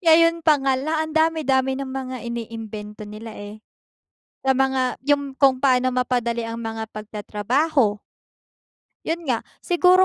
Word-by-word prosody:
ngayon 335 Hz, -1 st, +5 dB
pa 310 Hz, -, +8 dB
nga 265 Hz, -1 st, +2 dB
lang 310 Hz, +4 st, -1 dB
ang 315 Hz, 0 st, -2 dB
dami-dami 290 Hz, -5 st, +2 dB
ng 270 Hz, -1 st, -4 dB
mga 260 Hz, -1 st, -4 dB
iniimbento 220 Hz, -3 st, -6 dB
nila, 215 Hz, +1 st, -9 dB
eh. 205 Hz, +1 st, -9 dB, 0.8 s
Sa 265 Hz, -1 st, +2 dB
mga 265 Hz, -1 st, +1 dB
yung 285 Hz, -2 st, +1 dB
kung 265 Hz, -2 st, +4 dB
paano 255 Hz, -1 st, +3 dB
mapadali 245 Hz, -2 st, 0 dB
ang 230 Hz, 0 st, -5 dB
mga 225 Hz, -1 st, -4 dB
pagtatrabaho. 215 Hz, +3 st, 0 dB, 1.1 s
Yun 335 Hz, +1 st, -2 dB
nga, 245 Hz, -5 st, 0 dB, 0.2 s
siguro 360 Hz, +1 st, +5 dB
260 Hz, 135 wpm, -23 LUFS, 225-295 Hz, 1.1 s, pa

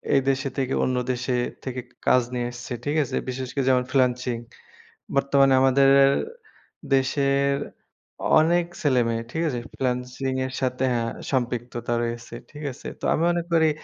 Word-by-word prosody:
এই 135 Hz, -, +5 dB
দেশে 135 Hz, 0 st, 0 dB
থেকে 135 Hz, -1 st, 0 dB
অন্য 130 Hz, -, 0 dB, 0.2 s
দেশে 125 Hz, 0 st, -1 dB, 0.3 s
থেকে 130 Hz, -1 st, -4 dB, 0.3 s
কাজ 125 Hz, -, +6 dB
নিয়ে 120 Hz, -1 st, -1 dB
আসছে, 120 Hz, +1 st, -10 dB
ঠিক 145 Hz, +1 st, 0 dB
আছে? 130 Hz, -, -5 dB
বিশেষ 130 Hz, 0 st, -4 dB
করে 135 Hz, -2 st, 0 dB
যেমন 125 Hz, -1 st, +3 dB
freelancing 125 Hz, -2 st, +1 dB, 0.8 s
বর্তমানে 140 Hz, -1 st, +4 dB
আমাদের 135 Hz, +1 st, +5 dB, 0.2 s
এর 135 Hz, 0 st, +4 dB, 0.8 s
দেশের 140 Hz, +1 st, +2 dB, 0.9 s
অনেক 170 Hz, +2 st, +3 dB, 0.2 s
ছেলেমেয়ে, 120 Hz, -6 st, +2 dB
ঠিক 165 Hz, -, -1 dB
আছে? 125 Hz, -5 st, -2 dB
freelancing 125 Hz, +1 st, -2 dB
এর 130 Hz, -, -7 dB
সাথে 130 Hz, 0 st, 0 dB
হ্যাঁ 115 Hz, -1 st, -1 dB, 0.2 s
সম্পৃক্ততা 120 Hz, -2 st, -2 dB
রয়েছে, 120 Hz, 0 st, -5 dB, 0.2 s
ঠিক 150 Hz, 0 st, -10 dB
আছে? 125 Hz, -, -9 dB
তো -, -, -7 dB
আমি 160 Hz, -, +1 dB
মনে 175 Hz, 0 st, 0 dB
করি 160 Hz, -1 st, +5 dB
130 Hz, 150 wpm, -24 LUFS, 125-140 Hz, 0.9 s, কাজ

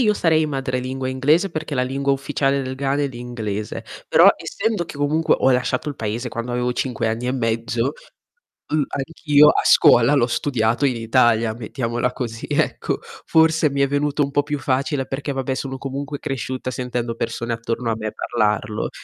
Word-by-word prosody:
io 215 Hz, -4 st, +4 dB
sarei 160 Hz, -3 st, +2 dB
madrelingua 130 Hz, -2 st, -3 dB
inglese 150 Hz, +9 st, +2 dB
perché 155 Hz, -2 st, -4 dB
la 125 Hz, -, +1 dB
lingua 140 Hz, +2 st, 0 dB
ufficiale 140 Hz, 0 st, 0 dB
del 130 Hz, 0 st, -4 dB
Ghana 140 Hz, +1 st, 0 dB
è 140 Hz, -, 0 dB
l'inglese. 120 Hz, -4 st, -5 dB, 0.2 s
Però -, -, +7 dB
essendo 215 Hz, -4 st, -2 dB
che 150 Hz, -, -10 dB
comunque 150 Hz, +3 st, +2 dB
ho 130 Hz, -, +3 dB
lasciato 130 Hz, +2 st, 0 dB
il 145 Hz, -, -5 dB
Paese 115 Hz, +3 st, -3 dB
quando 115 Hz, +1 st, -5 dB
avevo 125 Hz, 0 st, 0 dB
5 120 Hz, -3 st, -2 dB
anni 115 Hz, +2 st, -2 dB
e 125 Hz, -, 0 dB
mezzo 115 Hz, +1 st, -1 dB, 0.8 s
mh, 155 Hz, 0 st, +2 dB
anch'io 150 Hz, 0 st, +3 dB
a -, -, +2 dB
scuola 120 Hz, +5 st, +6 dB
l'ho 125 Hz, -4 st, +4 dB
studiato 120 Hz, 0 st, 0 dB
in 130 Hz, -3 st, +1 dB
Italia, 115 Hz, -1 st, +2 dB
mettiamola 120 Hz, +1 st, -2 dB
così 115 Hz, -3 st, -5 dB
ecco. -, -, 0 dB, 0.3 s
Forse 160 Hz, -1 st, +4 dB
mi 140 Hz, 0 st, -1 dB
è 140 Hz, -, +4 dB
venuto 145 Hz, +1 st, 0 dB
un 140 Hz, -, -3 dB
po' 145 Hz, -, +3 dB
più 145 Hz, 0 st, -3 dB
facile 135 Hz, +1 st, -1 dB
perché, 140 Hz, +2 st, -4 dB
vabbè, 135 Hz, 0 st, -2 dB
sono 135 Hz, 0 st, -4 dB
comunque 140 Hz, +2 st, -5 dB
cresciuta 130 Hz, -2 st, -4 dB
sentendo 125 Hz, -2 st, -3 dB
persone 115 Hz, 0 st, -3 dB
attorno 115 Hz, +1 st, -2 dB
a -, -, 0 dB
me 110 Hz, -1 st, -4 dB
parlarlo. 105 Hz, -2 st, -1 dB
130 Hz, 175 wpm, -21 LUFS, 120-145 Hz, 0.8 s, Però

